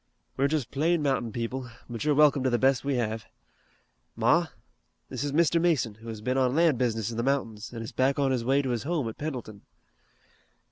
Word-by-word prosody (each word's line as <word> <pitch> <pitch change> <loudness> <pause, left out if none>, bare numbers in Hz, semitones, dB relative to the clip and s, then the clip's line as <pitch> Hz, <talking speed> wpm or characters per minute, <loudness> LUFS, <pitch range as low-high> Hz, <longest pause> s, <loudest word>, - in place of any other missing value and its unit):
We're 140 - +2
just 150 -4 -2
plain 160 +3 +1
mountain 135 -5 0
people, 120 +2 -4 0.2
but 120 0 -5
you're 150 -1 +2
welcome 145 -2 +5
to 130 - +1
the 120 - +2
best 135 +1 +2
we 140 -1 0
have. 110 -2 -2 0.9
Ma, - - +3 0.6
this - - -4
is 145 - -2
Mr. 165 +2 +3
Mason, 155 -10 +1
who 110 +2 -14
has 110 -2 -6
been 130 +4 0
on 130 0 +2
lan' 165 -3 +4
business 115 -3 -1
in 115 - -6
the - - +1
mountains, 115 -5 -2
an' 115 -2 -6
is 110 - -7
back 135 +2 +1
on 140 -2 +2
his 125 -3 0
way 135 +3 +2
to 130 - -1
his 120 -2 -1
home 150 -4 -1
at 110 - -7
Pendleton." 125 -9 -5
130 Hz, 215 wpm, -27 LUFS, 115-145 Hz, 0.9 s, welcome